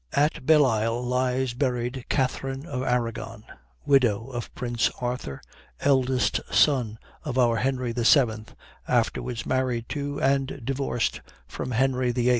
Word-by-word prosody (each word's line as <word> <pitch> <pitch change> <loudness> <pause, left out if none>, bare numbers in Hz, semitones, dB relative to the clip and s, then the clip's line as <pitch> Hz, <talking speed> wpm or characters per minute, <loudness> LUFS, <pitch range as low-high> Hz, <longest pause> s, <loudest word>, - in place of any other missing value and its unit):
At 145 -2 +1
Bellisle 120 -6 +3
lies 125 0 0
buried 125 -1 -2
Catharine 135 +1 -1
of 125 -7 -4
Arragon, 115 -3 -2 0.4
widow 125 -4 +2
of 120 -2 -5
prince 120 -1 0
Arthur, 120 - -4 0.4
eldest 130 -4 +2
son 125 -7 +3 0.3
of 135 -4 -3
our 120 -2 +3
Henry 130 0 -1
VII, 115 -2 +3 0.4
afterwards 120 -2 0
married 125 -3 -1
to, 145 +1 -3
and 135 +1 +1
divorced 135 -4 -1 0.3
from 125 - -5
Henry 130 0 +1
VIII. 120 0 +1
125 Hz, 120 wpm, -26 LUFS, 120-135 Hz, 0.4 s, Bellisle